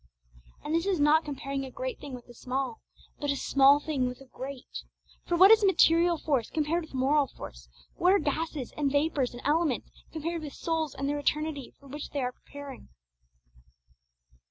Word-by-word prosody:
And 305 - -3
this 335 +3 +1
is 380 -5 +1
not 300 +2 +5
comparing 275 -1 -4
a 265 - -6
great - - -5
thing 280 -3 -7
with 245 - -12
a 240 - -13
small, 255 0 -3 0.4
but 290 - -2
a 280 - +2
small 275 +1 +5
thing 285 -4 -1
with 250 +1 -6
a 270 - -13
great. 260 0 -8 0.5
For 345 - +1
what 380 +4 +9
is 445 -1 +7
material 345 -3 +5
force 275 -7 0
compared 320 +2 0
with 315 -4 -10
moral 275 +2 +3
force? - - -11 0.3
what 360 - +4
are 400 - +6
gases, 300 -4 -2
and 285 -2 0
vapours, 285 -3 +1
and 240 - -9
elements, 305 -2 +1 0.2
compared 330 +1 -3
with 295 -3 -7
souls 320 -3 -2
and 275 +1 -2
the 290 +1 -1
eternity 300 -1 -2
for 280 - -19
which 290 +2 -7
they 285 - -3
are 250 - -1
preparing? 285 0 -11
290 Hz, 185 wpm, -29 LUFS, 270-320 Hz, 0.5 s, what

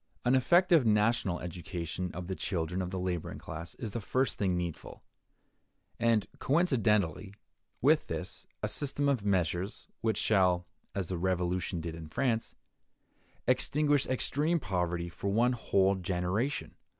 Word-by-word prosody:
An 125 - +4
effective 170 +4 +5
national 105 -4 +2
education 90 0 -4
of 90 0 -5
the 95 - -3
children 90 -1 -2
of 90 - -3
the 95 - -4
laboring 90 -2 -3
class 80 +1 -7
is 115 -4 -5
the 115 - -3
first 130 +6 0
thing 95 -3 0
needful; 85 -2 -5 1.0
and, 115 -3 +3
coincidently 105 - +1 0.5
with - - +4
this, - - -5 0.2
a - - +2
system 145 0 -1
of 135 -7 +1
measures 95 -1 -1
which 110 -2 +1
shall 90 -4 +3 0.3
(as 95 -4 -2
the 90 -2 -2
Revolution 90 -1 0
did 80 0 -4
in 80 -1 -8
France) 120 - -1 0.9
extinguish 145 +3 +2
extreme 150 +6 +2
poverty 90 - -1
for 85 +3 -4
one 120 +5 +3
whole 100 -5 +2
generation. 95 +7 -1
95 Hz, 140 wpm, -31 LUFS, 90-125 Hz, 1.0 s, effective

